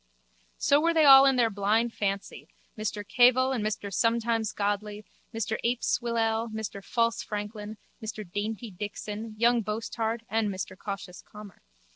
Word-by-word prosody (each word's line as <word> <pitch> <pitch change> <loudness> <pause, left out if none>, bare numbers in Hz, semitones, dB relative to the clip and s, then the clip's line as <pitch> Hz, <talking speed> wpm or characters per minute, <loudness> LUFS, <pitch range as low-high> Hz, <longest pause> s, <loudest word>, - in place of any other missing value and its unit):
So 285 +1 +3
were 335 +1 +2
they 315 -2 +5
all 270 0 +9
in 270 - +4
their 235 -3 +2
blind 215 +4 +1
fancy, 195 -1 -3 0.3
Mr 210 -1 -4
Cavil 255 +3 +4
and 245 -5 -1
Mr 210 -2 -3
Sometimes 230 -1 +1
Godly, 205 0 -3 0.3
Mr 225 -1 -2
Ape 240 +1 0
Swillale, 230 -1 0
Mr 215 -2 -6
False 230 +1 0
Franklin, 210 0 -6 0.3
Mr 215 -2 -6
Dainty 210 +4 -4
Dixon, 210 +3 -6
Young 235 +1 +3
Boasthard 225 +1 -3
and 220 0 0
Mr 185 -1 -5
Cautious 195 -2 -7
Calmer. 210 -2 -13
220 Hz, 145 wpm, -28 LUFS, 205-235 Hz, 0.3 s, all